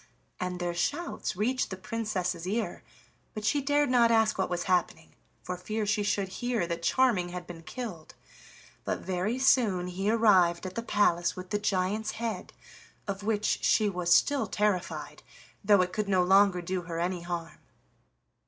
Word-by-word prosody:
And 180 -1 -3
their 175 -1 -2
shouts 290 - -2
reached 250 +7 0
the 190 - -6
Princess's 185 -5 -3
ear, 220 +4 -2 0.5
but 215 -1 -5
she 285 +5 +2
dared 290 0 +2
not 240 -2 +5
ask 225 -1 +3
what 190 - -1
was 175 -1 -2
happening, 175 -3 -1 0.3
for 180 - -4
fear 215 +4 -3
she 210 0 +1
should 205 -1 0
hear 240 -1 -1
that 170 0 -4
Charming 210 -3 +2
had 180 0 -6
been 175 -2 -10
killed. 180 -4 -7 0.7
But - - -3
very 190 +6 -2
soon 235 -9 +3
he 190 +3 -2
arrived 190 -6 +4
at 185 - -5
the 230 - -3
palace 175 -6 +1
with 185 +1 -9
the 205 - 0
giant's 205 +2 -1
head, 225 -4 -4 0.6
of 200 0 -3
which 210 0 0
she 215 -2 +3
was 180 -2 -2
still 285 +8 +4
terrified, 205 -4 -2 0.4
though 200 -2 +5
it 180 - -5
could 210 -2 -2
no 185 -2 +3
longer 190 -1 +4
do 185 +1 -2
her 170 -1 -6
any 175 +1 -1
harm. 170 -1 -5
195 Hz, 170 wpm, -29 LUFS, 180-220 Hz, 0.7 s, not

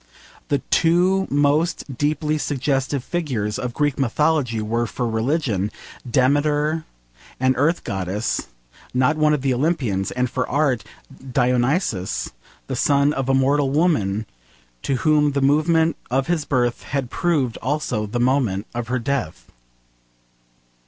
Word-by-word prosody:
The 140 -2 0
two 180 +3 +3
most 145 0 +1
deeply 150 +2 0
suggestive 135 -1 -1
figures 130 -12 -2
of 125 -1 -4
Greek 145 -2 0
Mythology 135 -2 +1
were, 115 +2 -1
for 120 +2 -3
religion, 110 - 0 0.4
Demeter, 145 +4 +2 0.5
an 130 0 +2
Earth 150 +7 +1
Goddess, 95 0 -2 0.5
not 130 +4 +3
one 155 0 +3
of 135 - -5
the 135 -2 +2
Olympians, 125 - 0
and 125 0 -1
for 125 +1 -3
art, 140 -5 +1 0.5
Dionysus, 125 - 0 0.3
the - - -4
son 140 0 +3
of 135 -2 -2
a 135 - +4
mortal 135 +1 +2
woman 135 - +1 0.6
to 135 - -1
whom 150 +1 +2
the 140 - +1
moment 160 +3 +3
of 130 +2 +1
his 170 -4 -1
birth 120 -3 0
had 135 -3 -3
proved 150 -9 0
also 125 -5 -2
the 120 +4 -3
moment 120 -6 +1
of 120 -1 -4
her 125 +1 0
death. 115 - -3
135 Hz, 130 wpm, -22 LUFS, 120-150 Hz, 0.6 s, a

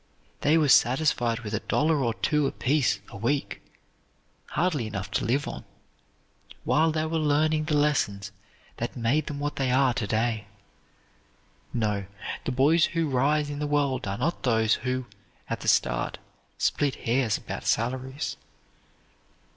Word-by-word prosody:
They 150 +3 +3
were 155 -2 +3
satisfied 125 -3 +3
with 110 -2 -6
a 105 - 0
dollar 150 -2 +1
or 115 -2 0
two 150 -2 +1
apiece 135 -6 +1
a - - -9
week, 140 +7 -1 0.9
hardly 155 -9 0
enough 100 -1 -5
to - - 0
live 140 +5 0
on, - - -6 1.0
while 160 +1 +3
they 155 0 -1
were 160 0 -1
learning 155 +1 +2
the 150 -2 +1
lessons 105 -9 0 0.5
that - - -4
made 130 +6 +1
them 145 -1 -4
what 145 0 -3
they 135 -2 0
are 130 0 +3
to 105 -1 -2
day. 110 -1 -1 1.2
No, 105 -4 -1 0.4
the - - -1
boys 150 +6 +4
who 165 -3 -1
rise 145 +3 +2
in 145 - -5
the 150 - -1
world 140 -5 0
are 95 +1 -2
not 170 +3 -1
those 110 -3 +2
who, 130 0 -2 0.4
at - - -3
the - - -7
start, - - +1 0.4
split 145 -2 +1
hairs 120 -2 0
about - - -7
salaries. 130 +4 -1
135 Hz, 150 wpm, -27 LUFS, 115-150 Hz, 1.2 s, boys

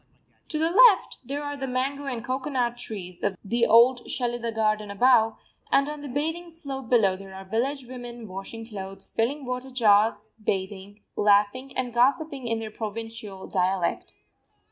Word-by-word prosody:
To 310 - -2
the 325 +2 +1
left 430 0 +6
there 280 +4 -4
are 290 0 -4
the 270 -1 -4
mango 270 +3 -2
and 240 -3 -4
cocoanut 255 -2 -1
trees 190 -7 -7
of 200 -2 -1
the 235 +3 +2
old 240 +2 +5
Shelidah 240 -2 -2
garden 215 -1 +1
above, 225 +2 +4 0.3
and 275 +1 +4
on 300 0 -5
the 290 - -6
bathing 320 +6 -2
slope 275 -7 -7
below 210 -6 +4
there 190 0 -11
are 190 0 -9
village 255 +7 -1
women 240 -2 -8
washing 195 +4 -7
clothes, 195 -3 -7
filling 270 +5 -1
water 250 +1 -4
jars, 220 -4 +4 0.3
bathing, 195 +1 -3
laughing 210 +6 +2
and 250 -2 -2
gossiping 265 +2 +1
in 230 -1 0
their 220 -1 -5
provincial 220 -2 -6
dialect. 185 -1 -1
235 Hz, 160 wpm, -26 LUFS, 210-265 Hz, 0.3 s, left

